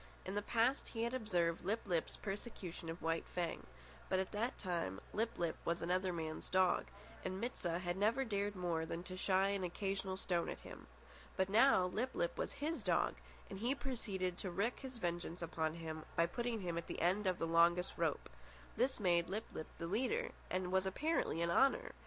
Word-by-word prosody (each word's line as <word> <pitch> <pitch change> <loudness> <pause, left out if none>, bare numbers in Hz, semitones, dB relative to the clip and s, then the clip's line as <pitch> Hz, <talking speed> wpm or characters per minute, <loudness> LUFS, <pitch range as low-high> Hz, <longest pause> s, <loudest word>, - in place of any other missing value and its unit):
In 190 - -3
the 205 - +1
past 235 +5 +2
he 225 -1 -2
had 235 +2 0
observed 180 -9 +1
Lip 215 +5 0
lip's 175 -5 0
persecution 195 -5 -5
of 165 0 -6
White 165 0 0
Fang; 170 - -3 0.4
but 190 - +3
at 190 0 -1
that 225 +4 -1
time 170 - -2
Lip 225 +2 0
lip 170 -2 0
was 170 0 0
another 185 +2 +1
man's 160 -2 -4
dog, 185 -1 +3 0.4
and 185 0 -2
Mit 240 +4 -2
sah 170 -1 -1
had 175 -1 -1
never 230 +7 +3
dared 205 -2 -1
more 175 -3 0
than 165 +1 -4
to 185 0 -6
shy 190 +1 +3
an 200 -1 0
occasional 195 +1 -2
stone 175 -3 0
at - - -5
him. - - -10 0.5
But 190 0 +2
now 215 -2 +6
Lip 230 +8 -1
lip - - 0
was - - -2
his 305 -1 -2
dog, 180 -5 +2 0.3
and 190 - -7
he 245 +6 +1
proceeded 195 -10 -2
to 190 - -3
wreak 200 +7 0
his 260 -2 -7
vengeance 175 -3 -2
on 160 -1 +1
him 160 -2 -5
by 165 - +5
putting 235 +4 -2
him 170 -2 -1
at 170 - -8
the - - -4
end 190 +4 +2
of 185 -1 +2
the - - 0
longest 170 +2 +4
rope. 165 -3 0 0.5
This 255 +1 +2
made 175 -3 +3
Lip 210 +4 -2
lip 155 - -5
the 165 - -4
leader, 225 +8 0 0.2
and 185 0 -1
was 190 0 +3
apparently 235 - +1
an 170 - +1
honour! 270 - +4
185 Hz, 200 wpm, -38 LUFS, 170-220 Hz, 0.5 s, now